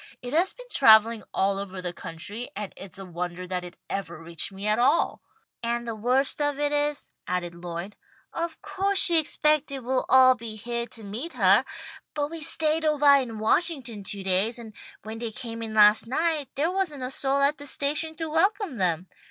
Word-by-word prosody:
It 245 +2 -6
has 350 +5 +2
been - - -13
travelling 225 -2 +6
all 195 0 0
over 195 -1 -6
the 180 -1 -4
country, 190 +8 -7
and 205 -1 -5
it's 195 0 -9
a 195 - -8
wonder 175 0 -5
that 180 0 -3
it 180 0 -10
ever 175 -4 -5
reached 165 +2 -5
me 195 +1 -7
at 210 +2 +2
all." 275 +7 +2 0.4
"And 235 0 -2
the 230 - -2
worst 255 +7 0
of 290 -1 0
it 290 0 0
is," 295 0 -1 0.2
added 180 -1 -2
Lloyd, 170 +3 -7 0.4
"of 335 -1 -4
co'se 395 0 -1
she 340 -3 +7
expected 300 -2 +1
we'd 255 +1 +1
all 260 0 +7
be 230 -3 -8
heah 235 +2 -4
to 225 -1 -10
meet 225 +12 -6
her. - - +5 0.5
But 295 0 -2
we 330 -1 -7
stayed 315 0 +2
ovah 290 -2 +5
in 230 -4 -6
Washington 240 - +1
two 195 0 -4
days, 195 +5 +1
and 225 -2 -9 0.3
when 220 +1 -7
they 235 -1 -3
came 230 +1 -6
in 220 -1 -5
last 210 +1 +6
night 310 +2 0
there 315 +5 0
wasn't 355 -8 -2
a 255 - -4
soul 270 +1 0
at 280 +2 +2
the 285 - -6
station 300 +4 -1
to 325 0 -4
welcome 385 - +1
them. 180 -2 0
240 Hz, 195 wpm, -26 LUFS, 200-295 Hz, 0.5 s, she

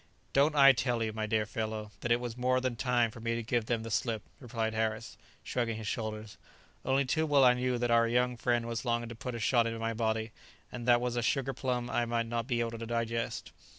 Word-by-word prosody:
"Don't 145 +3 +4
I 140 -1 +9
tell 120 -2 0
you, 110 -1 -2
my 110 0 -2
dear 110 0 +1
fellow, 110 -1 -4
that 120 - -3
it 120 - +4
was 120 -2 -5
more 130 +1 +2
than 130 -2 -2
time 120 -1 +1
for 120 - -11
me 115 +1 -1
to 115 - -3
give 115 0 -1
them 115 -2 0
the 115 - -6
slip?" 110 -1 -1 0.2
replied 115 -3 -3
Harris, 110 0 -2 0.3
shrugging 115 -3 -2
his 110 - -6
shoulders. 110 0 -4 0.4
"Only 135 +1 +2
too 160 +5 0
well 145 -2 +5
I 125 -1 +7
knew 125 0 0
that 120 0 0
our 115 0 +5
young 125 +1 +1
friend 120 0 0
was 115 0 -3
longing 120 -2 -1
to - - -6
put 120 +2 -5
a - - -4
shot 115 0 +3
into 115 0 -3
my 115 0 -2
body, 110 0 -1 0.4
and 120 0 -6
that 120 -1 +5
was 120 -1 -2
a - - +1
sugar 135 +2 0
plum 125 -1 -2
I 120 - 0
might 115 0 0
not 115 0 -3
be 120 -3 0
able 115 -1 -3
to 115 - -5
digest." 115 0 -2
120 Hz, 245 wpm, -31 LUFS, 115-125 Hz, 0.4 s, I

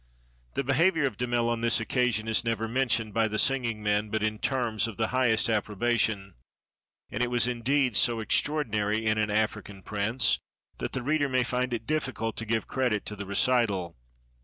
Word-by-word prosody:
The 140 - 0
behavior 160 +4 +2
of 130 - -2
Damel 120 0 0
on 120 -1 -1
this 115 0 +4
occasion 115 -1 0
is 110 +1 +1
never 115 -1 -1
mentioned 115 -3 0
by 115 +1 +2
the 110 0 -3
singing 120 -4 +1
men 105 0 0
but 110 0 -1
in 110 0 -1
terms 120 -5 0
of 110 - -8
the 110 -1 0
highest 125 -4 +2
approba 110 +2 0
tion; 100 -3 -1 0.8
and 110 - -3
it 125 - +1
was 120 -1 +2
indeed 125 +1 0
so 120 +1 +3
extraordinary 110 -4 0
in 110 0 +2
an 105 0 0
African 105 -2 -2
prince 110 +4 0 0.4
that - - -4
the 130 - -3
reader 145 +1 +1
may 130 -1 +2
find 125 +1 -1
it 115 -2 -3
difficult 125 -7 -2
to 110 - -4
give 115 0 0
credit 125 -6 -1
to 105 - -5
the 100 -1 -7
recital. 100 -6 +1
115 Hz, 185 wpm, -27 LUFS, 110-125 Hz, 0.8 s, this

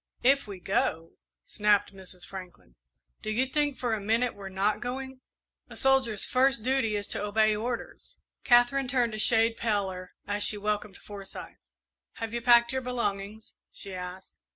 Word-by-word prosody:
"If 275 0 +4
we 195 -2 -7
go!" 165 -3 -1 0.3
snapped 210 -1 +1
Mrs. 185 -2 -11
Franklin. 185 - -11 0.5
"Do - - -4
you 235 +5 +1
think 290 +1 0
for 240 -3 -1
a 220 - 0
minute 230 +4 +1
we're 195 -1 -8
not 195 +2 0
going? 260 +1 -5 0.5
A - - -10
soldier's 265 -6 +3
first 255 -3 +3
duty 255 -4 +1
is 205 0 -3
to - - -2
obey 215 +1 +3
orders!" 235 +3 -5 0.2
Katherine 245 +2 +4
turned 245 -3 +1
a 215 - -4
shade 225 +1 +3
paler 190 -5 -2
as 205 0 -1
she 210 - +1
welcomed 210 -1 -2
Forsyth. 195 - -10 0.5
"Have 225 0 -5
you 235 - -2
packed 235 0 +5
your 260 - 0
belongings?" 220 -4 -3 0.2
she 195 - -8
asked. 180 +1 -7
215 Hz, 160 wpm, -28 LUFS, 200-245 Hz, 0.5 s, packed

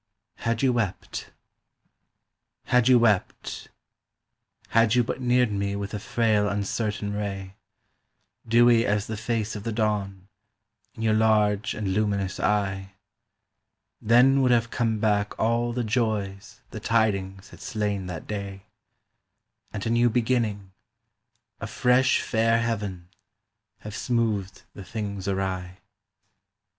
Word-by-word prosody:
HAD 115 +1 -2
YOU 130 -2 +3
WEPT 115 -6 -3 1.3
HAD 125 -1 +2
you 130 -1 +7
wept; 110 -5 0 1.0
had 115 0 +3
you 125 - +4
but 125 - -4
neared 125 -2 +2
me 100 0 -2
with 100 +1 -5
a 105 - -3
frail 105 -1 +1
uncertain 105 +1 -2
ray, 95 -2 -4 0.9
Dewy 115 0 +5
as 105 -2 0
the 110 - -5
face 110 0 -2
of 105 - -5
the 115 - -3
dawn, 100 -3 -2 0.7
in 110 - -6
your 110 -1 +3
large 105 -2 +2
and 105 -3 -3
luminous 100 -2 -1
eye, 95 -2 -1 1.1
Then 125 +5 +5
would 130 - +3
have 115 -2 +2
come 115 -2 0
back 105 -1 0
all 115 +1 +1
the 120 +1 -2
joys 105 -4 -2
the - - -6
tidings 100 -4 0
had - - -14
slain 105 -3 -2
that 85 -3 -6
day, 100 -2 -6 1.1
And 100 -2 -5
a 115 - 0
new 120 +1 +4
beginning, 110 -5 -1 0.9
a - - -5
fresh 125 +1 +3
fair 115 0 +2
heaven, 105 -6 -3 0.7
have 105 0 -8
smoothed 110 -6 -1
the 100 - -9
things 100 -2 -5
awry. 95 -2 -2
105 Hz, 125 wpm, -25 LUFS, 100-115 Hz, 1.3 s, you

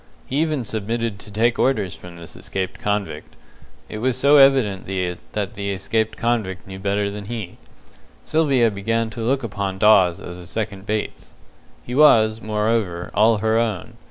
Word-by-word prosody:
He 135 - -3
even 155 -5 0
submitted 110 0 -3
to 105 - -13
take 115 +3 +1
orders 100 -8 +1
from 90 -1 -12
this 85 -1 -11
escaped 95 -1 -5
convict 100 -7 -3 0.5
it 105 - -6
was 125 +2 0
so 140 +3 +5
evident 135 -8 +4 0.5
that 105 -3 -3
the 100 0 -4
escaped 110 +3 -1
convict 110 -6 -1
knew 95 0 -9
better 100 +1 -1
than 100 0 -7
he. 110 -5 -6 0.7
Sylvia 140 -8 +2
began 110 +3 -1
to 115 - -7
look 130 +4 0
upon 100 -3 -3
Dawes 95 -4 +5
as 90 0 -8
a 90 - -11
second 100 -2 -5
Bates. 105 0 -4 0.5
He 125 - -7
was, 115 -6 +5
moreover, 105 -5 -1
all 110 +2 +4
her 110 +1 +3
own. 110 -7 -3
110 Hz, 160 wpm, -21 LUFS, 100-115 Hz, 0.7 s, so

